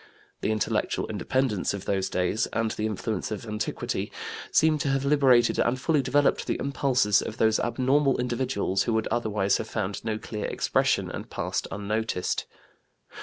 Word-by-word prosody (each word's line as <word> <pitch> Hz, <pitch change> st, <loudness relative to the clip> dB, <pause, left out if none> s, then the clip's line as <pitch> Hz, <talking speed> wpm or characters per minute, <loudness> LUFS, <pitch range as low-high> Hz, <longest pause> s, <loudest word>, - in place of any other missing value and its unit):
The -, -, 0 dB
intellectual 110 Hz, -1 st, 0 dB
independence 120 Hz, -8 st, 0 dB
of 100 Hz, -, -7 dB
those 95 Hz, -1 st, 0 dB
days 90 Hz, +5 st, 0 dB
and 115 Hz, -1 st, 0 dB
the 110 Hz, -, -2 dB
influence 110 Hz, -1 st, -3 dB
of 110 Hz, 0 st, -5 dB
antiquity 105 Hz, 0 st, -3 dB, 0.4 s
seem 155 Hz, -1 st, +3 dB
to 145 Hz, -, -1 dB
have 135 Hz, 0 st, 0 dB
liberated 135 Hz, -5 st, +4 dB
and 125 Hz, +2 st, +2 dB
fully 150 Hz, +2 st, +2 dB
developed 135 Hz, +2 st, +2 dB
the -, -, 0 dB
impulses 130 Hz, -7 st, +2 dB
of 110 Hz, -, -6 dB
those 110 Hz, -1 st, +3 dB
abnormal 130 Hz, +4 st, +2 dB
individuals 120 Hz, -6 st, 0 dB
who 115 Hz, +1 st, 0 dB
would 110 Hz, -, 0 dB
otherwise 105 Hz, -4 st, +1 dB
have 110 Hz, -, -5 dB
found 100 Hz, -3 st, -3 dB
no 110 Hz, -1 st, -1 dB
clear 105 Hz, -1 st, -5 dB
expression, -, -, +1 dB
and -, -, -7 dB
passed -, -, -2 dB
unnoticed. 105 Hz, -1 st, -2 dB
110 Hz, 160 wpm, -27 LUFS, 105-130 Hz, 0.4 s, liberated